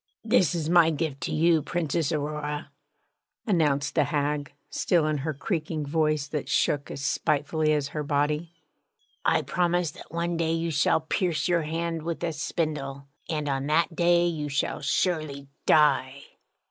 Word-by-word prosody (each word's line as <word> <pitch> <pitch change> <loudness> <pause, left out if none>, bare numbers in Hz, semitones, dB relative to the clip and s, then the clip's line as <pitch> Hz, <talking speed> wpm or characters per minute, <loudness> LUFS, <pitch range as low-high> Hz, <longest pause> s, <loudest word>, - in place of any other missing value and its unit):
'This 195 -7 +3
is 160 -3 -2
my 170 -1 +6
gift 155 -3 -2
to - - -3
you, 165 0 +3
Princess 165 -1 -1
Aurora,' 150 -1 -3 0.7
announced 150 -7 +1
the - - +3
hag, 145 -1 -1 0.2
still 170 -4 +2
in 155 -1 0
her 155 +4 -2
creaking 155 0 -3
voice 155 -1 +1
that 150 -1 -4
shook 145 -1 +1
as 140 - -5
spitefully 155 +1 +1
as 145 -2 0
her 150 +1 -3
body. 150 +3 0 0.7
'I - - +3
promise 175 -2 0
that - - -13
one 170 +1 -1
day 165 -1 +1
you 165 0 -1
shall 150 +2 +2
pierce 170 +1 0
your 175 -2 +2
hand 165 +1 -2
with 170 +1 -4
a 170 -1 -1
spindle, 145 -3 -3 0.2
and 150 -3 -2
on 135 0 -1
that 165 +2 +2
day 175 0 +4
you 155 -4 -2
shall 140 0 -1
surely 150 -2 -1 0.2
die!' 140 -3 +3
155 Hz, 160 wpm, -26 LUFS, 145-170 Hz, 0.7 s, my